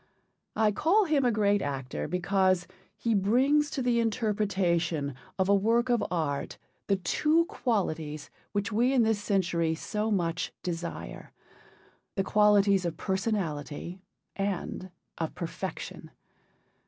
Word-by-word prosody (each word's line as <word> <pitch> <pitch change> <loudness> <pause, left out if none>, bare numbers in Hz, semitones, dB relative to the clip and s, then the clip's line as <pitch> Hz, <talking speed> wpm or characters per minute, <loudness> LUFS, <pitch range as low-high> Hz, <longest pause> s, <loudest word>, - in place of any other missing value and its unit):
I 220 -1 +3
call 375 - +3
him 305 -5 +2
a 245 - +3
great 205 -2 +2
actor 135 -4 -3
because 185 +1 +1 0.3
he 230 - 0
brings 260 +9 +3
to 265 - -3
the 240 -1 +2
interpretation 190 - 0 0.2
of 190 -1 +1
a 200 - +4
work 230 +5 +2
of 240 -3 +2
art 155 -5 -2 0.3
the 200 - +3
two 300 - +2
qualities 160 - -2 0.2
which 205 +1 -1
we 240 +5 +2
in 250 -3 +4
this 220 -2 +1
century 170 -5 +1
so 210 +6 -2
much 180 -3 -1
desire, 170 -1 -5 0.8
the 195 - +1
qualities 200 -1 +4
of 170 -2 -3
personality 185 -4 -3 0.3
and 195 -1 -3 0.3
of 160 -1 -3
perfection. 170 -2 -6
200 Hz, 125 wpm, -29 LUFS, 170-225 Hz, 0.8 s, a